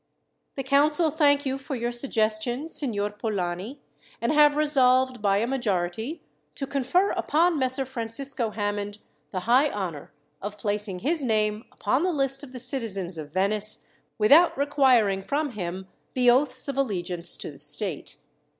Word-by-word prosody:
"The 270 - -3
council 295 +4 +3
thank 285 -2 +3
you 265 0 -1
for 270 0 -5
your 240 0 -2
suggestion, 240 +2 -1
Signor 210 -10 -2
Polani, 210 +3 -4 0.4
and 235 - 0
have 295 -1 +5
resolved, 260 -4 +3
by 200 -1 +3
a 215 - +1
majority, 225 - -2 0.3
to 275 - -3
confer 280 +8 +1
upon 330 +1 +2
Messer 260 +1 0
Francisco 245 0 -2
Hammond 205 -1 -3 0.3
the 185 - -4
high 255 +8 +4
honour 180 - -5 0.3
of 205 +1 -6
placing 205 -3 -3
his 320 +1 +1
name 215 -2 0
upon 255 +7 0
the 365 +1 +1
list 270 -1 0
of 275 - -10
the 255 - -8
citizens 205 - -3
of 150 -1 -8
Venice, 205 +4 0 0.3
without 290 +12 +6
requiring 260 -9 +3
from 285 +7 -1
him 185 -3 -5 0.3
the 250 -1 +5
oaths 255 +1 +1
of 275 -1 -3
allegiance 180 -8 -1
to - - -6
the 140 - -14
state. 150 +4 -3
240 Hz, 150 wpm, -26 LUFS, 205-275 Hz, 0.4 s, without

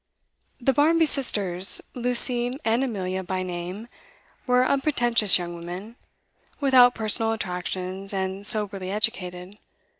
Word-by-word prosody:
The 270 +2 +1
Barmby 320 +4 +3
sisters, 200 - +1
Lucy 245 0 +1
and 230 +3 +2
Amelia 190 -6 -3
by 185 +1 -3
name, 180 +4 -6 0.6
were 250 0 +3
unpretentious 240 -7 +2
young 175 -1 -6
women, 180 +7 -8 0.6
without 255 -3 +5
personal 225 +1 +1
attractions, 185 -1 -5
and 190 +1 -2
soberly 200 -4 +1
educated. 190 -2 -3
210 Hz, 110 wpm, -24 LUFS, 185-245 Hz, 0.6 s, without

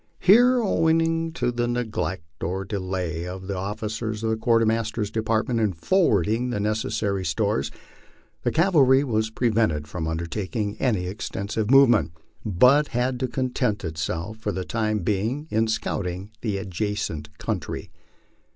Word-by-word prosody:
Here, 245 +6 +6
owing 165 -4 +2
to 145 -6 0
the 120 0 -1
neglect 105 -8 -3
or 95 +4 -2
delay 95 -4 -3
of 95 +1 -7
the 100 0 -3
officers 110 +3 -4
of 110 - +1
the - - +2
Quartermaster's 115 -2 +1
Department 110 +1 0
in 105 -4 +1
forwarding 110 - +2
the 120 - -2
necessary 105 -2 -1
stores, 85 -4 0 0.7
the - - +1
cavalry 145 -6 +4
was 110 -4 0
prevented 110 -10 +1
from 80 +1 -4
undertaking 95 +6 -3
any 105 -9 +1
extensive 100 +2 -3
movement, 120 -10 +5 0.3
but 125 +9 +4
had 125 0 0
to 130 - 0
content 125 -4 -1
itself 80 +5 -3
for 110 -1 -3
the 95 -1 -4
time 110 -2 -1
being 110 - -1
in 110 +1 +2
scouting 95 -3 -3
the 105 -4 -1
adjacent 95 -6 -4
country. - - -4
110 Hz, 135 wpm, -24 LUFS, 95-120 Hz, 0.7 s, Here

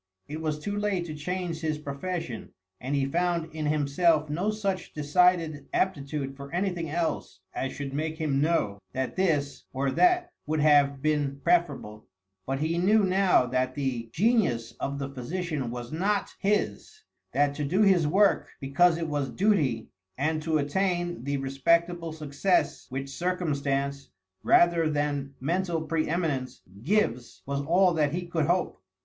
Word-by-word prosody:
It 155 +2 -6
was 155 -2 -1
too 205 +7 -4
late 205 -4 -1
to 155 - -6
change 170 +2 -3
his 155 -2 -1
profession, 150 -2 -5 0.3
and 135 +3 -2
he 140 -1 +1
found 170 +2 -1
in 155 -1 -2
himself 155 +1 +2
no 180 +7 0
such 200 -3 -2
decided 160 0 +2
aptitude 140 -6 -1
for 140 0 -10
anything 175 -2 -1
else 165 +1 -2
as 135 - -2
should 140 -1 -5
make 155 +2 -2
him 145 -4 0
know 145 -11 +1
that 130 -1 -2
this 150 -7 0
or 135 +1 0
that 360 - +3 0.2
would 155 0 0
have 145 -2 +4
been 145 -3 0
preferable; 145 -11 0 0.4
but 135 +1 -2
he 165 +2 0
knew 205 +4 +4
now 190 -6 +4
that 130 +1 -1
the 125 -5 -2
genius 160 - +1
of 140 0 -2
the 140 -1 -3
physician 140 +1 -4
was 120 0 -6
not 195 +5 0
his, 210 - -1 0.3
that 145 0 +2
to 150 - -3
do 185 +9 +2
his 185 -6 +4
work 195 +6 +3
because 165 +5 +3
it 165 -1 -2
was 145 -3 -1
duty, 155 - +1 0.3
and 155 +3 0
to 160 0 +1
attain 175 +2 -1
the 140 0 0
respectable 165 +5 +1
success 155 +4 0
which 135 +1 -4
circumstance, 140 -4 -2 0.3
rather 170 -2 +4
than 145 -2 -2
mental 170 +4 0
pre 160 0 -1
eminence, 155 -7 -2 0.2
gives, 125 - 0
was 140 0 -2
all 175 +5 +3
that 150 -2 +1
he 175 +1 -2
could 165 -3 -1
hope. 175 - 0
155 Hz, 155 wpm, -27 LUFS, 140-175 Hz, 0.4 s, have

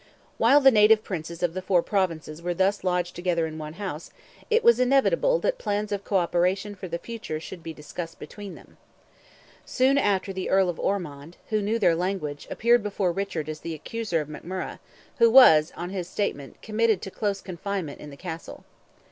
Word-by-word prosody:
While 290 +1 +6
the 270 -1 +7
native 215 -1 +5
Princes 170 -1 -6
of 175 -2 +1
the 185 - -4
four 185 -2 +2
Provinces 165 -5 -2
were 175 0 -2
thus 195 +2 +1
lodged 180 -1 -1
together 175 -2 0
in 160 0 -6
one 155 0 -6
house, 175 -4 -6 0.4
it 460 0 +3
was 470 +1 +6
inevitable 275 - +3
that - - 0
plans 210 - -2
of 200 -1 -2
co 200 - +1
operation 180 +3 0
for 185 -1 -8
the 170 0 -3
future 215 -6 -6
should 170 +2 -9
be 165 - -6
discussed 165 +2 -8
between 205 -2 -9
them. - - -17 0.9
Soon 270 +2 +2
after 195 -4 0
the 190 -1 -4
Earl 190 -1 +3
of 175 - -4
Ormond, 165 -5 -3
who 215 -1 +2
knew 210 +3 0
their 190 -6 +3
language, 165 -4 -3
appeared 240 +1 +3
before 200 -3 -1
Richard 175 -4 -3
as 155 0 -5
the 165 -1 -5
accuser 215 +2 -3
of 150 - -4
McMurrogh, 180 +5 -6 0.4
who 230 0 +7
was, 165 -12 +7
on 175 +1 -5
his 185 -3 -4
statement, 145 -10 -4
committed 220 -2 +1
to 195 - -6
close 200 -1 -2
confinement 185 -4 -5
in 150 - -9
the 140 - -12
Castle. 165 -1 -8
185 Hz, 190 wpm, -26 LUFS, 165-210 Hz, 0.9 s, the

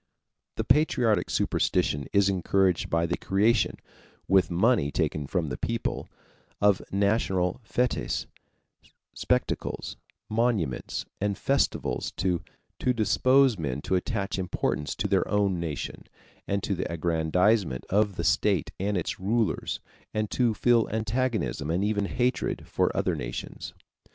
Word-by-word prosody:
The - - -1
patriotic 125 -7 +2
superstition 70 -1 0
is 100 -1 +4
encouraged 95 -1 +1
by 85 0 +2
the 85 - -1
creation, 105 +5 +2 0.5
with 95 -1 +4
money 95 - +2
taken 75 -1 -1
from 85 -2 -1
the - - -5
people, 115 0 -2 0.5
of 100 -2 +4
national 100 -1 +1
fêtes, 125 +4 -1 0.9
spectacles, - - -2 0.3
monuments, 110 - -1
and 100 -1 -1
festivals 135 - 0
to 90 -3 0 0.4
dispose 130 0 +3
men 70 -4 -2
to - - -2
attach 100 0 -1
importance 75 -5 -2
to 100 - -1
their 95 -1 +2
own 100 -3 +1
nation, 80 -4 -5 0.4
and 100 0 -1
to 100 - 0
the 90 - -3
aggrandizement 85 - +1
of 105 0 +2
the 85 - -3
state 85 0 +2
and 100 +1 0
its 85 - -3
rulers, 110 +4 0 0.3
and 105 -1 -1
to 120 -3 +2
feel 120 -1 +3
antagonism 110 - -1
and 85 +4 +1
even 105 -1 0
hatred 125 +4 -1
for - - +1
other - - +1
nations. - - -6
100 Hz, 125 wpm, -27 LUFS, 85-110 Hz, 0.9 s, is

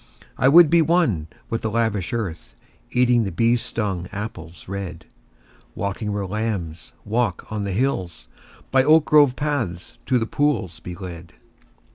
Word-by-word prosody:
I 130 - +2
would 160 +2 +7
be 170 -1 +6
one 155 - +2 0.2
with 115 - -1
the 110 - -1
lavish 110 -4 -1
earth, 85 - -4 0.3
Eating 125 -1 +3
the 95 - -3
bee 115 +8 +2
stung 100 -6 -3
apples 95 -5 -7
red: 95 -3 -6 0.7
Walking 100 +2 -3
where 100 -1 -2
lambs 95 -5 -4
walk 115 +2 -1
on 105 -1 -2
the 100 - -3
hills; 95 -6 -2 0.4
By 130 -1 +4
oak 155 +2 +5
grove 145 -4 +5
paths 125 - -3
to 130 - +3
the 115 - 0
pools 115 - -1
be 90 +2 -8
led. 85 -2 -9
105 Hz, 150 wpm, -22 LUFS, 90-125 Hz, 0.7 s, would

